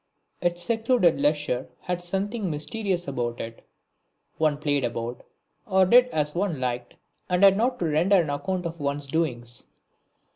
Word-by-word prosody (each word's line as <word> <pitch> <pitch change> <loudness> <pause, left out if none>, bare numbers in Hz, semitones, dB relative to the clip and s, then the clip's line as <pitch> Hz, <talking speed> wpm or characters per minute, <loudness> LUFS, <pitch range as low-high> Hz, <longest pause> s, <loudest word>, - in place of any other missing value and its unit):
Its 175 0 0
secluded 225 - +2
leisure 145 -3 0
had 180 -1 -3
something 195 +3 -2
mysterious 175 +4 -2
about 120 -3 -3
it; 115 0 -7 0.8
one 155 -2 +2
played 145 -2 0
about, 120 0 -3 0.5
or 190 -2 +4
did 245 +6 +6
as 150 -9 -1
one 175 -5 -1
liked 125 -1 -3 0.3
and 180 +1 +2
had 195 -1 +8
not 245 +4 +1
to 175 - -2
render 170 +6 +3
an 160 -4 0
account 180 +6 -2
of 170 0 -5
one's 145 0 -2
doings. 125 -6 -2
165 Hz, 150 wpm, -26 LUFS, 140-190 Hz, 0.8 s, had